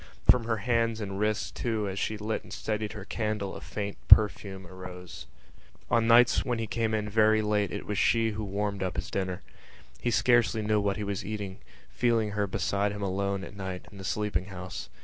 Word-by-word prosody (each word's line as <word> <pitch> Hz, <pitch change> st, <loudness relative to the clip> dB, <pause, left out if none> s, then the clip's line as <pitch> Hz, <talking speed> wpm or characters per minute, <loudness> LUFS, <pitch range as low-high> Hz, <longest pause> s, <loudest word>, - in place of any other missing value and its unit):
From 125 Hz, -2 st, +6 dB
her 115 Hz, -1 st, 0 dB
hands 115 Hz, -2 st, +1 dB
and 100 Hz, -2 st, -4 dB
wrists 105 Hz, 0 st, 0 dB
too 110 Hz, -4 st, -2 dB
as 95 Hz, 0 st, -3 dB
she 110 Hz, -, -1 dB
lit 105 Hz, +1 st, -2 dB
and -, -, -15 dB
steadied 105 Hz, -1 st, -3 dB
her 105 Hz, -3 st, -8 dB
candle 105 Hz, -3 st, -2 dB
a -, -, -8 dB
faint 100 Hz, -1 st, -5 dB
perfume 100 Hz, -2 st, +5 dB
arose. 90 Hz, -3 st, -9 dB, 0.6 s
On 115 Hz, -1 st, +3 dB
nights 120 Hz, +1 st, +6 dB
when 120 Hz, -2 st, -1 dB
he 115 Hz, -, -2 dB
came 110 Hz, 0 st, 0 dB
in 105 Hz, -1 st, -2 dB
very 110 Hz, 0 st, +4 dB
late 105 Hz, -2 st, +1 dB
it -, -, -5 dB
was 105 Hz, -1 st, -2 dB
she 115 Hz, -1 st, +3 dB
who 110 Hz, 0 st, -4 dB
warmed 100 Hz, 0 st, -2 dB
up 95 Hz, -2 st, -2 dB
his 100 Hz, +7 st, -4 dB
dinner. 95 Hz, -2 st, -2 dB, 0.6 s
He -, -, 0 dB
scarcely 120 Hz, -2 st, +3 dB
knew 105 Hz, 0 st, +2 dB
what 100 Hz, -1 st, 0 dB
he 105 Hz, -, -3 dB
was 100 Hz, -1 st, -3 dB
eating, 100 Hz, -1 st, -5 dB, 0.3 s
feeling 115 Hz, -3 st, +1 dB
her 105 Hz, 0 st, 0 dB
beside 100 Hz, +2 st, 0 dB
him 105 Hz, 0 st, -5 dB
alone, 100 Hz, 0 st, -1 dB
at 100 Hz, -, -9 dB
night, 95 Hz, -2 st, -5 dB
in 100 Hz, -, -12 dB
the -, -, -7 dB
sleeping 95 Hz, -1 st, -1 dB
house. 95 Hz, -2 st, -7 dB
105 Hz, 205 wpm, -29 LUFS, 100-110 Hz, 0.6 s, From